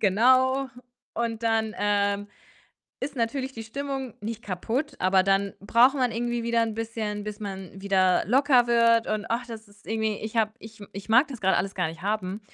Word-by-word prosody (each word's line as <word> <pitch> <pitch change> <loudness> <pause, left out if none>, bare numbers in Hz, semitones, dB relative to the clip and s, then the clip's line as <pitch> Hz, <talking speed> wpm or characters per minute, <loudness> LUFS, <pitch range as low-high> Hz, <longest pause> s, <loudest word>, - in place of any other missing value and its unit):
genau. 260 +6 +3 0.5
Und 230 0 -2
dann, 225 -1 +1
ähm, 205 0 +1 0.7
ist 280 +2 -4
natürlich 260 +3 -2
die 225 - -7
Stimmung 270 +1 -5
nicht 225 +1 -4
kaputt, 225 - -3
aber 185 0 +3
dann 195 +1 +1
braucht 235 +7 +4
man 255 -3 +1
irgendwie 240 +1 -2
wieder 235 0 +1
'n 225 -1 -1
bisschen, 220 -2 -4
bis 210 0 -6
man 195 -3 -6
wieder 190 -2 +2
locker 255 +1 +4
wird 230 -1 +4
und 215 -1 -2
ach, 240 +2 -1
das 225 -2 -9
ist 205 0 -22
irgendwie 220 -1 -1
ich 220 +2 -6
habe 215 -1 +2
ich 220 -1 -13
ich 200 +1 -8
mag 255 +6 +5
das 260 -5 -8
grad 190 - +3
alles 195 +2 -2
gar 180 -3 0
nicht 165 +1 -9
haben 200 -1 -2
220 Hz, 185 wpm, -26 LUFS, 200-240 Hz, 0.7 s, mag